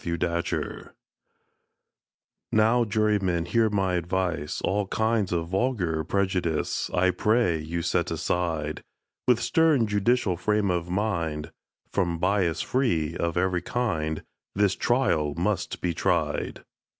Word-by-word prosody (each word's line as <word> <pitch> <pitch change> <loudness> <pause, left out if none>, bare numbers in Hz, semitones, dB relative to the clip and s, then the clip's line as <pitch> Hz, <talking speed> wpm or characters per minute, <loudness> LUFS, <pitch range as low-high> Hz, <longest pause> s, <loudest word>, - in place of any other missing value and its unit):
THE - - -4
USHER'S 85 0 -1
CHARGE - - -4 1.6
NOW, 115 +2 +4
Jurymen, 105 -5 +1
hear 110 +5 +2
my 95 -3 0
advice— 85 -3 -1
All 100 0 0
kinds 110 -2 0
of 85 -1 -1
vulgar 95 -7 0
prejudice 90 -3 -1
I 95 +1 +2
pray 105 -6 +2
you 85 +2 -4
set 85 - 0
aside: 80 -4 -2 0.5
With 125 -2 +4
stern 135 +1 +3
judicial 105 -2 +1
frame 105 +1 +1
of 85 -1 -2
mind— 85 -6 -2 0.4
From 85 -4 0
bias 90 -2 +1
free 85 - 0
of 85 0 -1
every 90 -1 +1
kind, 80 -9 -2 0.3
This 100 -1 +3
trial 85 - +1
must 95 +3 -1
be 85 - 0
tried! - - -1
95 Hz, 125 wpm, -26 LUFS, 85-110 Hz, 1.6 s, NOW